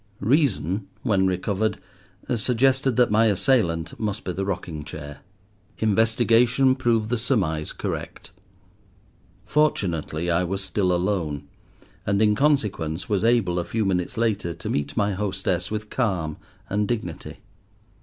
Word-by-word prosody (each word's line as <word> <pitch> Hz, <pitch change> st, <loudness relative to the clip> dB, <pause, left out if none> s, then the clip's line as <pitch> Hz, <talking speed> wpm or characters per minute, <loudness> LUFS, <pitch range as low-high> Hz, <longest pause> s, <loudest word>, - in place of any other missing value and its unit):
Reason, 100 Hz, -, +1 dB, 0.2 s
when 100 Hz, -6 st, +2 dB
recovered, 100 Hz, +3 st, 0 dB, 0.6 s
suggested 130 Hz, +2 st, +2 dB
that 125 Hz, -3 st, +3 dB
my 110 Hz, +2 st, +4 dB
assailant 95 Hz, -, +1 dB
must 105 Hz, -1 st, -2 dB
be 90 Hz, -, -3 dB
the 95 Hz, +2 st, -3 dB
rocking 85 Hz, -5 st, -4 dB
chair. 75 Hz, -1 st, -8 dB, 0.6 s
Investigation 115 Hz, +4 st, +3 dB
proved 115 Hz, -4 st, 0 dB
the 120 Hz, -, +1 dB
surmise 90 Hz, -, 0 dB
correct. -, -, -5 dB, 1.1 s
Fortunately 85 Hz, -, 0 dB
I 85 Hz, +2 st, +2 dB
was 95 Hz, +2 st, -2 dB
still 95 Hz, 0 st, 0 dB
alone, 85 Hz, -6 st, -1 dB, 0.6 s
and 100 Hz, 0 st, +1 dB
in 105 Hz, -1 st, +4 dB
consequence 105 Hz, -, 0 dB
was 100 Hz, -2 st, +1 dB
able, 115 Hz, -7 st, +2 dB
a -, -, -1 dB
few 110 Hz, +4 st, -1 dB
minutes 95 Hz, +4 st, -1 dB
later, 105 Hz, -7 st, 0 dB
to -, -, -6 dB
meet 70 Hz, 0 st, -2 dB
my 105 Hz, -1 st, +2 dB
hostess 95 Hz, -2 st, -1 dB
with 105 Hz, 0 st, -5 dB
calm 90 Hz, -, -1 dB, 0.3 s
and 105 Hz, +1 st, 0 dB
dignity. 110 Hz, -9 st, -4 dB
100 Hz, 130 wpm, -24 LUFS, 90-115 Hz, 1.1 s, my